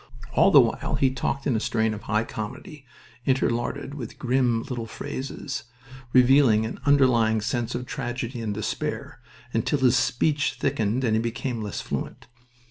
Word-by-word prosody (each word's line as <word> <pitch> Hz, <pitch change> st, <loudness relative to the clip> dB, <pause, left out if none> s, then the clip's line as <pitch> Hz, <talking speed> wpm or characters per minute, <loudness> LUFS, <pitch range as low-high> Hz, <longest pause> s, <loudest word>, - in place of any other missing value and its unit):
All -, -, +5 dB
the -, -, +8 dB
while -, -, -1 dB
he 135 Hz, -1 st, +2 dB
talked 135 Hz, +1 st, -2 dB
in 130 Hz, -, +1 dB
a -, -, +1 dB
strain 110 Hz, -1 st, 0 dB
of 105 Hz, -, -7 dB
high 110 Hz, 0 st, 0 dB
comedy 130 Hz, -, -7 dB, 0.4 s
interlarded 130 Hz, +2 st, 0 dB
with 130 Hz, -6 st, -7 dB
grim 125 Hz, -3 st, +1 dB
little 120 Hz, -3 st, -5 dB
phrases, 135 Hz, +4 st, -5 dB, 0.5 s
revealing 125 Hz, -3 st, +5 dB
an 110 Hz, -, -6 dB
underlying 120 Hz, -6 st, +4 dB
sense 120 Hz, +2 st, -2 dB
of 125 Hz, +1 st, -4 dB
tragedy 120 Hz, 0 st, -4 dB
and 110 Hz, -2 st, -2 dB
despair, 110 Hz, -, -4 dB, 0.3 s
until 115 Hz, +6 st, +1 dB
his 130 Hz, -2 st, +4 dB
speech 145 Hz, +4 st, +1 dB
thickened 120 Hz, -2 st, 0 dB
and 110 Hz, -3 st, +2 dB
he 110 Hz, -, +2 dB
became 115 Hz, +1 st, -3 dB
less 105 Hz, -2 st, -4 dB
fluent. -, -, -5 dB
120 Hz, 155 wpm, -25 LUFS, 110-135 Hz, 0.5 s, the